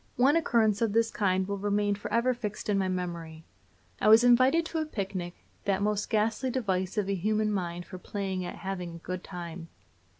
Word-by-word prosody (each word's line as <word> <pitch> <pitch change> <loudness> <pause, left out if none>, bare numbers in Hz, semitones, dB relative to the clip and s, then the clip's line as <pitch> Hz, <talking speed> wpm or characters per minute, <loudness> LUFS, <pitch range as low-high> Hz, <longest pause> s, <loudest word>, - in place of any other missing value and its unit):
One 270 +5 +4
occurrence 230 - +2
of 225 -3 +1
this 225 0 +2
kind 190 -2 +1
will 200 0 -3
remain 205 0 +1
forever 230 +5 0
fixed 215 -3 -5
in 200 -1 +2
my 190 - +1
memory. 170 -3 -4 0.6
I - - +2
was 220 +2 +8
invited 255 +7 +5
to 325 0 -3
a 315 - -1
picnic, 190 - -4 0.3
that 200 0 +1
most 210 0 0
ghastly 225 +4 +1
device 195 -6 -1
of 210 - +2
the 200 - -1
human 215 +3 0
mind 175 -3 -3
for 185 - -9
playing 190 -2 -3
at 175 - -5
having 180 -3 -5
a 170 - -13
good 185 0 -4
time. 170 -2 -7
200 Hz, 195 wpm, -29 LUFS, 185-225 Hz, 0.6 s, was